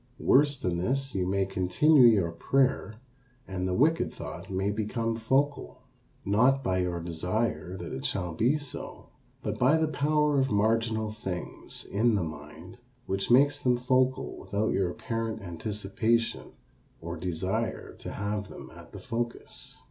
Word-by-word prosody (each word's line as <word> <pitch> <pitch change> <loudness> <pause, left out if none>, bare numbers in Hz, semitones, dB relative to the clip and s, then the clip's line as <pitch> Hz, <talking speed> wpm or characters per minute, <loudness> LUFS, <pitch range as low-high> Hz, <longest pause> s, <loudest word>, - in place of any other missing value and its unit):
Worse 145 +1 +4
than 90 -6 -1
this, 135 +7 -1
you 90 -2 0
may 95 0 +1
continue 95 - +4
your 100 -7 +3
prayer 130 +5 +1 0.5
and 95 -1 -3
the 90 - 0
wicked 160 - +2
thought - - -8
may 95 +1 0
become 115 +2 -2
focal. 135 +6 0 0.4
Not 125 +7 +3
by 95 -5 +1
your 90 -1 -1
desire 90 +3 -2
that 85 -2 -6
it 65 - -5
shall 90 +4 -2
be 120 - +2
so, 145 -4 -7 0.3
but - - -3
by 135 +6 +5
the 160 0 +1
power 150 0 +2
of 135 0 +2
marginal 110 +1 +1
things 95 -5 -6
in 110 +2 +2
the 100 - +1
mind 80 +5 -9 0.3
which 95 0 -2
makes 145 +4 +5
them 125 -3 +2
focal 130 +1 +1
without 100 +3 -1
your 95 -2 +1
apparent 115 +1 -4
anticipation 105 +5 -1 0.5
or 85 +1 -5
desire 90 +2 -3
to - - -6
have 100 0 -3
them - - -10
at - - -14
the - - -7
focus. 120 +2 -5
110 Hz, 150 wpm, -28 LUFS, 95-130 Hz, 0.5 s, by